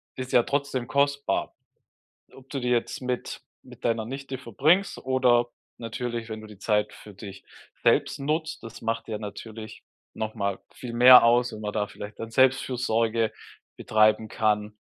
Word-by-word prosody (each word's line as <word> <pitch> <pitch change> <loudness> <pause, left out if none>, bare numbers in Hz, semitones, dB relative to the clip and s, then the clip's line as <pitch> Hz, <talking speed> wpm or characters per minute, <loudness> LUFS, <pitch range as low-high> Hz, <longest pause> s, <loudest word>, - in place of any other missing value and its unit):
ist 130 -1 -6
ja 120 - +6
trotzdem 140 -3 -2
kostbar. 140 0 0 0.8
Ob 135 0 -16
du 140 - -3
die 125 - -2
jetzt 120 +1 0
mit 125 -1 -4 0.2
mit - - -15
deiner 115 -2 0
Nichte 135 +1 -6
verbringst 150 - +1
oder 125 -2 +2 0.3
natürlich, 115 0 -5
wenn 110 0 -6
du 110 - -11
die 105 -2 -13
Zeit 105 -1 0
für 105 - -13
dich 100 0 -10 0.4
selbst - - +2
nutzt, 155 +2 -2
das 115 0 -10
macht 115 0 -2
ja 110 -1 -3
natürlich 110 +1 -9 0.3
nochmal 105 -3 -3
viel 120 -2 -8
mehr 125 +1 +9
aus, 120 +1 +3
wenn 110 - -8
man 105 -1 -4
da 105 -1 -1
vielleicht 105 0 -9
dann 115 0 -6
Selbstfürsorge 115 -3 +2 0.5
betreiben 110 0 +2
kann. 105 -1 0
115 Hz, 155 wpm, -26 LUFS, 110-130 Hz, 0.8 s, mehr